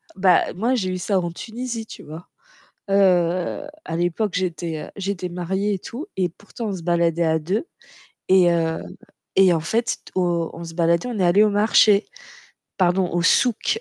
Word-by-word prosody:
Bah, 185 -2 +3
moi 230 +8 0
j'ai 190 -6 -1
eu 185 - -2
ça 190 +1 0
en 175 -1 -3
Tunisie, 230 +3 -6
tu - - -11
vois? 160 +3 -10 0.6
Heu, 180 +3 +2 0.2
à 165 - -4
l'époque, 175 +4 -1
j'étais, 170 -3 -2
heu, - - -13
j'étais 195 -2 -3
mariée 190 +4 -2
et - - -3
tout 265 - -8
et 185 -2 +1
pourtant, 205 +6 -9
on 195 - -3
se 175 - -9
baladait 170 0 +1
à 160 0 +2
2, 190 - -2 0.6
et 185 -2 +5
heu 165 -1 0 0.6
et 190 -2 +6
en 165 - +1
fait 225 +8 -1 0.2
au 175 -3 0
on 170 - -8
se 165 0 -8
baladait, 170 +4 +1
on 235 -5 -4
est - - +2
allés 185 +5 +5
au 215 - +4
marché. 210 0 +4 0.7
Pardon 180 -1 +2
au 175 - 0
souk 245 - +2
185 Hz, 185 wpm, -22 LUFS, 170-205 Hz, 0.7 s, et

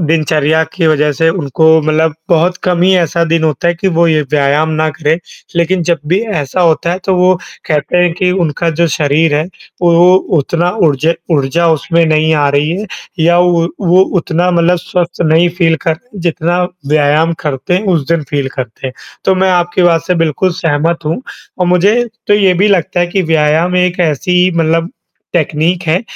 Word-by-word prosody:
दिनचर्या 155 -1 +1
की 175 -3 0
वजह 150 -1 +2
से 165 +4 +1
उनको 160 -3 -2 0.2
मतलब 155 0 0
बहुत 175 +1 +2
कम 180 -2 0
ही 185 - +4
ऐसा 170 0 0
दिन 165 0 0
होता 155 +2 0
है 175 - +1
कि 185 +3 -1
वो 170 - +4
ये 155 -1 +2
व्यायाम 145 +1 +1
ना 155 - +1
करें। 155 +1 -1 0.4
लेकिन 175 +1 +1
जब 170 0 +1
भी 180 +4 +2 0.2
ऐसा 145 +5 -3
होता 170 0 +1
है 180 - -3
तो 190 - +1
वो, 180 +1 +3 0.3
कहते 150 +1 -1
हैं 175 -1 +2
कि 180 +1 0
उनका 165 +2 -1
जो 170 - +4
शरीर 150 +1 +1
है, 150 +1 0 0.4
वो 170 -1 +4
वो 180 +1 +6 0.2
उतना 170 +5 -1 0.2
ऊर्जे 155 +3 +1 0.2
ऊर्जा 150 +4 +1
उसमें 165 +2 +1
नहीं 155 0 +2
आ 145 -2 +2
रही 145 +2 0
है, 215 - -6 0.3
या 170 +2 +3
वो 175 -1 +2
वो 180 -1 +3 0.2
उतना 175 +3 -1
मतलब 175 0 +2
स्वस्थ 175 0 -3
नहीं 165 +3 +3
फ़ील 165 -2 +2
करते 180 +7 -4
जितना 170 +1 -1 0.3
व्यायाम 155 +2 +2
करते 140 +3 -2
हैं, 190 +4 -1
उस 165 -7 0
दिन 165 -2 0
फ़ील 140 -2 -1
करते 130 0 -6
हैं। 130 - -5 0.3
तो 190 - +3
मैं 190 0 +1
आपकी 175 0 0
बात 165 -3 +3
से 180 - +1
बिल्कुल 165 +4 0
सहमत 165 -1 -1
हूँ, 165 +12 -2 0.4
और 180 - +1
मुझे 180 +4 +3 0.3
तो 205 - +3
ये 195 -3 +3
भी 195 +4 +2
लगता 180 -3 0
है 175 - +2
कि 185 +2 -1
व्यायाम 160 +3 +1
एक 180 0 0
ऐसी 180 +3 +1
मतलब 165 +1 0 0.4
टेक्नीक 170 +2 0
है, 170 +3 0
165 Hz, 195 wpm, -12 LUFS, 155-180 Hz, 0.4 s, वो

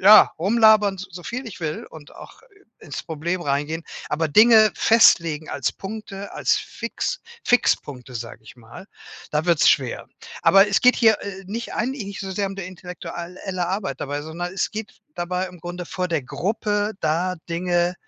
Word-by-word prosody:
ja, 210 +3 +8
rumlabern 210 +1 +4
so 185 -1 -9
viel 255 +5 -5
ich 200 - -9
will 155 -1 -3
und 150 -2 -13
auch - - -13 0.4
ins 145 - -7
Problem 170 +3 -3
reingehen, 145 +3 -1 0.3
aber 155 +1 0
Dinge 215 +4 +7
festlegen 165 -9 +4
als - - -1
Punkte, 200 -1 -8
als - - +2
Fix - - -4 0.2
Fixpunkte, 135 - +1
sage 115 -1 -7
ich 110 - -14
mal, 120 +11 -13 0.4
da 150 +2 0
wird's 170 -3 +4
schwer. 130 -4 +1 0.3
Aber 195 +1 +6
es 195 - +2
geht 250 0 +5
hier, 220 -3 +4
äh, 195 -1 -7
nicht 230 +4 -5
eigentlich 245 0 -2
nicht 200 - -7
so 195 -1 -5
sehr 200 +1 -1
um 195 - -8
die 195 - -5
intellektual 180 -1 -8
elle 180 -2 -2
Arbeit 185 -9 -3
dabei, 145 +1 -3
sondern 175 +3 -5
es - - -1
geht 215 0 -6 0.2
dabei 180 +2 -2
im 180 -2 -14
Grunde 175 +1 -6
vor 180 +1 -3
der 160 -5 -1
Gruppe, 205 - -1
da 170 +4 0 0.2
Dinge 175 +1 +1
180 Hz, 175 wpm, -23 LUFS, 160-205 Hz, 0.4 s, ja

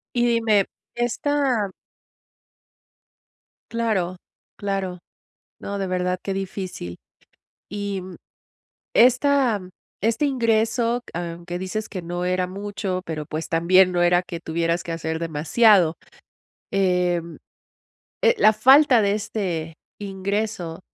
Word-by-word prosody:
Y 240 - +3
dime, 225 -4 +3 0.3
esta 240 -3 0 2.0
Claro, 205 -6 -1 0.4
claro. 195 -3 -3 0.6
No, 200 - -4
de 195 - -2
verdad 180 0 -1
qué 195 - -3
difícil. 190 - -5 0.7
Y, 200 -2 -3 0.9
esta 250 -3 +4 0.4
este 225 +6 +1
ingreso, 235 -2 +1
aunque 175 +1 -5
dices 205 +3 -4
que 185 -3 -6
no 175 +1 -4
era 185 0 +1
mucho, 195 -1 -4
pero 155 -2 -4
pues 155 +2 -4
también 180 +3 +4
no 175 - +1
era 175 +1 +4
que 170 -2 -8
tuvieras 170 +1 -1
que 170 - -5
hacer 160 -1 -3
demasiado. 165 +3 +3 0.8
Em, 180 -3 0 0.8
eh, 470 0 +5
la 215 - +6
falta 260 +3 +6
de 200 -1 +2
este 190 -7 -3 0.2
ingreso. 195 -3 -3
190 Hz, 105 wpm, -23 LUFS, 175-220 Hz, 2.0 s, la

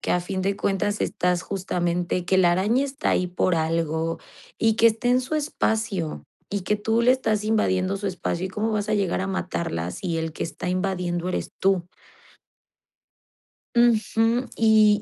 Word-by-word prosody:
que - - -3
a 180 - +2
fin 185 +2 -4
de 195 +1 0
cuentas 205 +1 -1
estás 180 0 0
justamente 180 -2 -2
que 190 +1 +2
la 175 -2 +5
araña 215 +10 +2
está 280 +2 -2
ahí 180 - +1
por 180 0 0
algo, 160 0 -1 0.4
y 225 -1 +3
que 230 - +5
está 230 +2 +2
en 250 +1 +4
su 260 +5 -4
espacio, 220 - -1 0.3
y 200 0 -2
que 210 +3 0
tú 220 +3 +1
le 250 - +5
estás 220 -5 +1
invadiendo 195 -3 +1
su 200 - -4
espacio 185 -1 -2
y - - -6
cómo 215 +3 -2
vas 210 0 -1
a 215 - +2
llegar 195 -4 0
a 190 - -2
matarla, 170 - -3
si 170 - -3
el 160 0 -3
que - - -4
está 170 - -5
invadiendo 180 -1 -1
eres 185 - -3
tú. 185 -2 +1 1.9
Ujú. 230 +1 +3
Y 215 -2 +5
195 Hz, 175 wpm, -24 LUFS, 180-220 Hz, 1.9 s, la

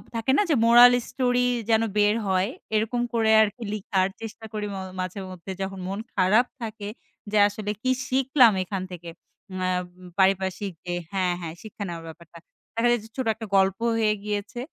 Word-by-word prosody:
থাকে 230 +3 0
না - - +5
যে, 300 - +4
মোরাল 240 +1 +9 0.2
স্টোরি, 250 -1 +1 0.2
যেন 220 0 +4 0.2
বের 210 +1 +4
হয়। 190 +2 +1 0.3
এরকম 230 +3 0
করে 220 -1 +3
আর 215 - +5
কি 240 - -9
লিখার 190 -2 0
চেষ্টা 225 0 -8
করি 210 -1 -3
ম - - -5 0.2
মাঝে 185 +2 -4
মধ্যে, 185 +1 -8
যখন 190 0 -4
মন 200 +2 -3 0.2
খারাপ 205 +6 +4 0.2
থাকে, 215 -2 -6 0.4
যে 215 - +2
আসলে 205 0 -4
কি 255 - 0 0.2
শিখলাম 260 -3 +4
এখান 190 0 -4
থেকে? 170 -1 -8 0.4
উম 185 - -5
আ - - +1 0.5
পারিপার্শিক 190 +1 +1
যে 175 - -3 0.2
হ্যাঁ, 185 -2 +1
হ্যাঁ, 160 -1 -5
শিক্ষা 215 -1 -7
নেওয়ার 165 -1 -6
ব্যাপারটা। 170 +1 -14 0.4
দেখা 230 +1 +2
যায় 240 - +2
যে, - - -12
ছোট 260 - -1
একটা 225 0 -7
গল্প 195 0 +3 0.2
হয়ে 215 -1 +3
গিয়েছে। 210 +3 -4
210 Hz, 185 wpm, -25 LUFS, 190-230 Hz, 0.5 s, মোরাল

